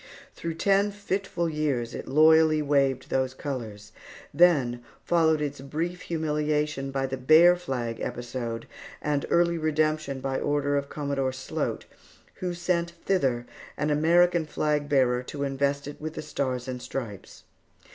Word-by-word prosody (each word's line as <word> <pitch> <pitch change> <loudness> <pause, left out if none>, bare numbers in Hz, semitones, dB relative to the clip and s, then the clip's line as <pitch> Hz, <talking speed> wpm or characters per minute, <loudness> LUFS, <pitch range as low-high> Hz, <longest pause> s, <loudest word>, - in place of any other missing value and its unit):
Through 165 -1 -5
ten 200 +4 +3
fitful 195 -3 -2
years 145 -7 -1
it - - -6
loyally 155 +2 +5
waved 140 -2 +1
those 130 0 0
colors; 110 -8 -6 0.4
then 135 -9 +3 0.2
followed 160 -3 +3
its 145 -2 -4
brief 165 +6 -3
humiliation 150 -3 -1
by 135 0 -1
the 130 0 -3
Bear 155 +7 +6
Flag 125 -10 -4
episode, 120 -1 -4 0.3
and 145 -1 -1
early 170 -1 +3
redemption 155 -3 0
by 135 0 -2
order 145 -1 0
of 140 0 -1
Commodore 140 -3 -2
Sloat, 130 0 -3 0.5
who 180 -1 -3
sent 170 -1 -1
thither 130 -11 +1 0.3
an 150 +1 0
American 170 +2 +3
flag 150 -1 -1
bearer 125 -3 +3
to 140 +3 -5
invest 140 +1 -1
it 145 - -9
with 155 +1 -5
the - - -5
Stars 130 -4 -3
and 125 -1 -5
Stripes. 115 -9 -7
145 Hz, 140 wpm, -27 LUFS, 130-160 Hz, 0.5 s, Bear